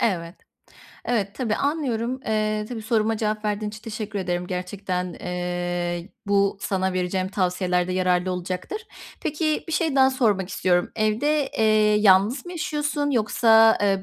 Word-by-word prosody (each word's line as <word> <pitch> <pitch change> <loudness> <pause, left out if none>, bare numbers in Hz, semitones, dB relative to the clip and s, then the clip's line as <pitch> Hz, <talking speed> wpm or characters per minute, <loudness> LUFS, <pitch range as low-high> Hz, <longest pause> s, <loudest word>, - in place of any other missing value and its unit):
Evet. 175 -5 -1 0.7
Evet, 210 -4 -1
tabii, 235 -5 -1
anlıyorum. 260 -4 -1
Eee, 215 -1 0
tabii, 235 -3 -6
soruma 225 0 +1
cevap 215 0 -2
verdiğin 210 0 -1
için 215 0 -11
teşekkür 215 -2 -5
ederim. 180 -1 -2
Gerçekten, 180 0 -3
eee, 175 0 -3 0.2
bu 200 -1 +2
sana 190 -1 -1
vereceğim 185 +1 -1
tavsiyelerde 180 -1 0
yararlı 185 0 +1
olacaktır. 180 - -4 0.4
Peki 310 0 -1
bir - - -4
şey 315 -3 +1
daha 265 0 +6
sormak 210 -8 +1
istiyorum. 180 -2 +1
Evde, 265 +7 +1
eee, 220 - +3 0.4
yalnız 210 - +4
mı 355 - -6
yaşıyorsun 295 -4 -1
yoksa, 225 -2 +5
eee, 195 -1 +2
210 Hz, 140 wpm, -24 LUFS, 185-235 Hz, 0.7 s, daha